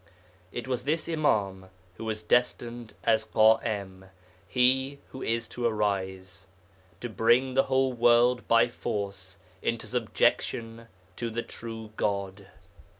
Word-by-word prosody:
It 120 - -5
was 125 -2 -2
this 155 +4 -1
Imâm 100 - 0 0.3
who 115 - -6
was 110 -1 -3
destined 120 0 0
as 110 -1 +3
Ḳa'im 110 -4 +2 0.4
(he 130 +2 +2
who 130 - -9
is 115 0 -1
to 120 -1 -1
arise) 95 -3 -2 0.5
to 120 - -3
bring 120 +4 +3
the 135 - +3
whole 130 -1 +2
world 120 +1 +4
by 115 0 +5
force 100 -5 -5 0.2
into 115 -1 -2
subjection 115 0 0 0.3
to 120 - -2
the 115 +1 -3
true 115 -2 -8
God. 100 -1 -2
115 Hz, 125 wpm, -28 LUFS, 100-120 Hz, 0.5 s, by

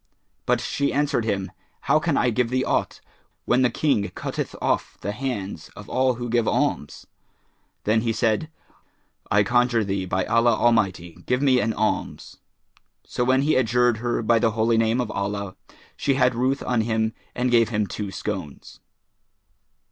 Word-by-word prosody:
But - - +2
she 140 0 -1
answered 145 -5 0
him, 100 -3 -2 0.3
"How - - +3
can - - 0
I 125 - +2
give 120 +1 0
thee 130 +1 0
aught, - - -1 0.4
when 125 +1 +3
the 125 - +4
King 120 -5 0
cutteth - - -4
off - - -1
the 100 - -3
hands 105 - -5
of - - -11
all 130 0 +1
who 120 +1 -5
give 120 -1 +1
alms?" - - -1 0.8
Then 110 +1 +2
he 115 0 0
said, 115 +5 0 0.8
"I 105 +1 +4
conjure 120 +1 +2
thee 95 -1 -2
by 95 +1 -1
Allah 115 +1 +3
Almighty, 90 -7 0
give 125 +2 +1
me 130 -3 +4
an 115 0 0
alms;" 110 +1 -3 0.7
so 125 - -2
when 130 +2 +3
he 155 - +2
adjured 120 -1 +2
her 120 0 -2
by 115 +1 +3
the 115 -1 +1
Holy 115 +1 +2
Name 115 +2 +2
of 120 -4 -2
Allah, 100 -1 -3 0.4
she 140 -2 0
had 125 -2 +3
ruth 130 +4 0
on 120 -2 +1
him 110 0 0 0.2
and 125 0 0
gave 115 -2 +4
him 105 -2 0
two 100 0 -5
scones. 95 -6 -6
115 Hz, 170 wpm, -23 LUFS, 105-125 Hz, 0.8 s, the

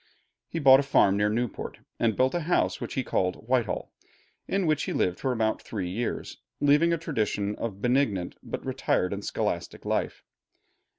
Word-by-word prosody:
He - - -5
bought 135 -4 +7
a - - +3
farm 120 -8 +4
near 105 +1 +2
Newport, 120 +1 -3 0.2
and 115 -3 +2
built 130 +1 +3
a 175 - +1
house 170 +2 +1
which - - -5
he 130 - 0
called 90 -5 0
Whitehall, 125 -2 0 0.6
in 195 -1 0
which 155 -2 +1
he - - -3
lived 90 0 0
for 130 - 0
about 110 -3 0
three 95 -5 -4
years, 115 +5 -3 0.2
leaving 145 +4 +4
a 170 - +2
tradition 105 -9 -1
of 115 -3 -3
a - - -16
benignant 110 -4 0
but - - -6
retired 90 +2 0
and 100 0 -5
scholastic - - -3
life. - - -1
120 Hz, 180 wpm, -27 LUFS, 100-140 Hz, 0.6 s, bought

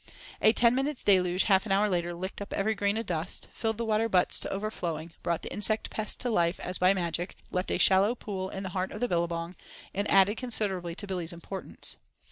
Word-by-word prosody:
A 215 - +7
ten 235 +1 +4
minutes' 270 +2 -1
deluge 185 -2 +4
half 195 0 +3
an - - -3
hour 200 +2 +4
later 175 -3 0
licked 190 +3 -6
up 200 - -6
every 215 +3 +1
grain 205 0 0
of 225 - -2
dust, 170 +1 -3
filled 225 -1 -2
the 230 - -2
water 220 +1 +1
butts 180 -3 +3
to - - -4
overflowing, 175 -6 -4
brought 170 -1 -1
the - - -5
insect 215 +1 +1
pest 215 -1 -2
to 245 - +1
life 170 -4 +2
as 180 - -4
by 185 +1 +5
magic, 175 -1 -2 0.2
left 180 +1 -1
a - - +1
shallow 195 +5 +4
pool 190 -5 -5
in 195 0 -5
the 190 - -4
heart 185 +1 -2
of - - -6
the 245 - +1
billabong, 170 -1 -1 0.4
and 200 +2 -1
added 195 +2 +5
considerably 195 -8 -1
to 205 - -5
Billy's 180 -4 -3
importance. 180 +3 -5
195 Hz, 220 wpm, -29 LUFS, 175-215 Hz, 0.4 s, A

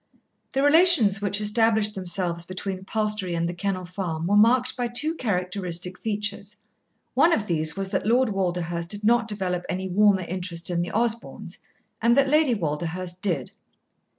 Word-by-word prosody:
The 270 - +1
relations 290 - +5
which 200 0 0
established 215 0 +2
themselves 175 -2 -2
between 185 +1 -6
Palstrey 210 -4 -1
and 170 0 -1
The 175 - -3
Kennel 185 0 -3
Farm 175 -3 -4
were 200 +4 +2
marked 240 +4 +4
by 245 -1 -1
two 290 +7 0
characteristic 180 - -3
features. 210 -1 -4 0.6
One 340 - +4
of 225 -11 +1
these 160 -3 0
was 195 -1 -3
that 195 - -2
Lord 245 +2 +3
Walderhurst 175 -3 -2
did 205 +1 -3
not 235 +1 +3
develop 185 -4 -2
any 190 +1 -3
warmer 195 0 +3
interest 175 -1 -4
in 170 -1 0
the 175 - -4
Osborns, 230 +1 -3 0.4
and 235 +2 +3
that 275 -1 +4
Lady 300 -4 +3
Walderhurst 175 +2 -4
did. 165 -10 -1
195 Hz, 160 wpm, -24 LUFS, 180-225 Hz, 0.6 s, relations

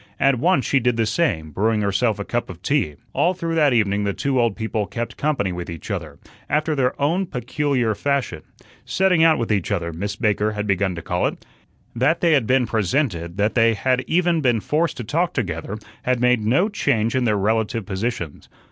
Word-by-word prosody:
At 135 -3 +3
once 175 -1 +2
she 140 - +2
did 125 -1 +1
the 115 - +2
same, 105 - 0
brewing 110 +6 +1
herself 100 +2 +1
a 100 - -5
cup 120 0 -2
of 90 -1 -10
tea. 115 - 0 0.2
All 180 +2 +2
through 165 -2 -3
that 150 -3 +3
evening 105 -4 +2
the 100 -1 0
two 135 -3 +1
old 115 -4 +1
people 110 -2 -2
"kept 120 0 -5
company" 140 -11 0
with 90 -1 -6
each 85 +5 -7
other, 80 -7 -5 0.3
after 155 +2 +1
their 130 -3 0
own 170 +7 +1
peculiar 125 -3 -1
fashion. 135 - -1 0.4
"Setting 185 -4 +2
out 160 -1 +5
with 115 -2 -2
each 100 -3 0
other" 85 -4 -2
Miss 100 +5 -4
Baker 105 -1 0
had 105 0 -3
begun 100 -2 0
to 85 - -7
call 90 0 0
it. - - -7 0.5
That 135 +8 +2
they 170 - +3
had 135 -8 +3
been 130 -1 +3
presented, 100 - -1
that 105 +1 +1
they 115 -1 +3
had 130 +4 0
even 170 -1 +2
been 120 -5 +2
forced 155 +9 0
to 120 - -4
talk 165 +10 0
together, 95 - -3 0.2
had 125 -1 0
made 125 -2 +3
no 135 - +3
change 120 - 0
in 130 -1 +1
their 105 -3 +2
relative 110 +1 0
positions. 95 -5 -4
115 Hz, 205 wpm, -22 LUFS, 100-140 Hz, 0.5 s, out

